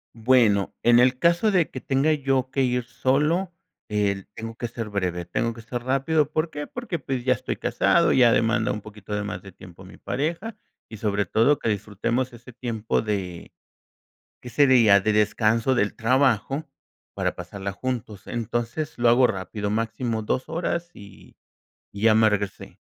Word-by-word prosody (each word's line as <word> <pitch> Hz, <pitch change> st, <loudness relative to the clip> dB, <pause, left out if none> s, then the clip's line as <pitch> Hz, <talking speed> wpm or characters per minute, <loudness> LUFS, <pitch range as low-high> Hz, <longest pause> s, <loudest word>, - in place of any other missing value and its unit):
Bueno, 115 Hz, -4 st, +3 dB
en 120 Hz, 0 st, +6 dB
el 125 Hz, +1 st, +4 dB
caso 170 Hz, +8 st, +3 dB
de 180 Hz, -5 st, +2 dB
que 130 Hz, -, -7 dB
tenga 140 Hz, +3 st, +2 dB
yo 135 Hz, -3 st, 0 dB
que 140 Hz, -1 st, 0 dB
ir 125 Hz, -1 st, +1 dB
solo, 145 Hz, +9 st, 0 dB, 0.4 s
eh, 100 Hz, -2 st, 0 dB
tengo 115 Hz, 0 st, -6 dB
que 120 Hz, -, -4 dB
ser 115 Hz, -2 st, -6 dB
breve, 90 Hz, -3 st, -2 dB
tengo 115 Hz, +6 st, -1 dB
que 115 Hz, -, -10 dB
ser 120 Hz, +1 st, -5 dB
rápido, 140 Hz, +3 st, +1 dB
¿por 155 Hz, +1 st, -1 dB
qué? 145 Hz, -1 st, -5 dB
Porque, 240 Hz, -10 st, -5 dB
pues 130 Hz, -2 st, -4 dB
ya 130 Hz, -, +4 dB
estoy 130 Hz, +1 st, -4 dB
casado, 170 Hz, -1 st, +2 dB
ya 120 Hz, -3 st, +5 dB
demanda 115 Hz, 0 st, +2 dB
un 105 Hz, -, -4 dB
poquito 105 Hz, -1 st, -8 dB
de 105 Hz, -, -2 dB
más 105 Hz, -, -5 dB
de 100 Hz, -, -12 dB
tiempo 90 Hz, 0 st, -14 dB
mi 95 Hz, -, -14 dB
pareja 170 Hz, -, -3 dB, 0.3 s
y 110 Hz, -, -9 dB
sobre 105 Hz, -1 st, 0 dB
todo 115 Hz, +10 st, +3 dB
que 115 Hz, -, -2 dB
disfrutemos 110 Hz, +5 st, -2 dB
ese 120 Hz, +1 st, -13 dB
tiempo 115 Hz, -3 st, -2 dB
de 95 Hz, -5 st, -4 dB, 0.9 s
¿qué 125 Hz, -, -9 dB
sería? 120 Hz, -6 st, +5 dB
De 105 Hz, +3 st, +1 dB
descanso 110 Hz, +4 st, +2 dB
del 105 Hz, -4 st, 0 dB
trabajo 130 Hz, +3 st, +1 dB, 0.5 s
para -, -, -1 dB
pasarla 100 Hz, -1 st, -6 dB
juntos. 115 Hz, -3 st, -5 dB
Entonces 120 Hz, +6 st, -3 dB
lo 120 Hz, 0 st, +3 dB
hago 125 Hz, +2 st, +6 dB
rápido, 100 Hz, 0 st, -4 dB
máximo 115 Hz, +1 st, -2 dB
2 130 Hz, +4 st, -2 dB
horas 170 Hz, +1 st, -2 dB
y 100 Hz, -1 st, -15 dB, 0.5 s
y 100 Hz, -, -9 dB
ya 110 Hz, -1 st, +5 dB
me 110 Hz, 0 st, +5 dB
regresé. 100 Hz, -2 st, -4 dB
120 Hz, 175 wpm, -24 LUFS, 105-135 Hz, 0.9 s, en